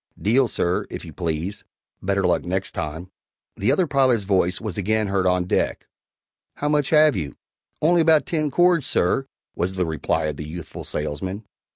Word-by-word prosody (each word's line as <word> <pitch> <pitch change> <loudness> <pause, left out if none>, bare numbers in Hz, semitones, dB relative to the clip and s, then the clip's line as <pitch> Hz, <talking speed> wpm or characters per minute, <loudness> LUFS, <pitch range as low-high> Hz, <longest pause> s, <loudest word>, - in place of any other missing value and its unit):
(Deal, 125 +5 +3
sir, 90 -4 0
if - - -7
you - - -10
please; 85 +4 -3 0.4
better - - 0
luck - - +2
next - - -2
time.)" 80 +4 -5 0.4
The 100 - +1
other 185 - +3
pilot's 130 -7 +2
voice 95 -2 +1
was 105 -5 -5
again 105 +1 0
heard 95 -1 +1
on 90 0 +2
deck: 90 - -1 0.7
"How 145 - -2
much 150 -2 +2
have 155 -2 +5
you?" 75 -7 -4 0.5
"Only 170 +2 +5
about 160 -2 +4
ten 155 -3 0
cords, 175 -1 +3
sir," 135 +10 +1 0.3
was 90 +2 -1
the 90 -1 0
reply 80 -1 -1
of 75 -2 -3
the 75 - -6
youthful 85 -1 -7
salesman. 95 +8 -4
100 Hz, 175 wpm, -23 LUFS, 90-145 Hz, 0.7 s, have